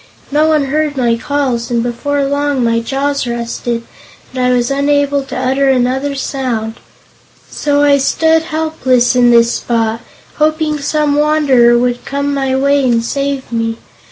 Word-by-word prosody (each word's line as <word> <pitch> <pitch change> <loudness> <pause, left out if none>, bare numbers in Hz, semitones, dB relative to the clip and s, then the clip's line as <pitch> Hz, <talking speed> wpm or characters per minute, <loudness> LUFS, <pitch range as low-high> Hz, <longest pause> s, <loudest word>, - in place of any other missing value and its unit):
No 300 +2 +2
one 310 -2 +2
heard 295 +1 -1
my 240 -3 +2
calls 250 -2 -2
and 235 -1 0
before 280 +4 -2
long 285 -1 -1
my 230 0 +1
jaws 275 +3 -2
rusted, 235 0 -3 0.5
and 255 -1 -2
I 250 - +2
was 245 +1 +1
unable 285 0 +1
to - - -6
utter 270 +2 +1
another 265 +2 0
sound. 245 -5 -3 0.7
So 290 0 0
I 285 -1 +4
stood 320 +4 +2
helpless 285 -7 0
in 245 -1 +4
this 235 0 +4
spot, 230 -1 -1 0.4
hoping 310 0 0
some 295 0 0
wanderer 280 -6 +3
would 245 0 -1
come 280 +1 -2
my 270 -1 -1
way 280 +1 +2
and 235 -2 +1
save 275 +1 -3
me. 225 -1 -2
270 Hz, 155 wpm, -14 LUFS, 240-285 Hz, 0.7 s, I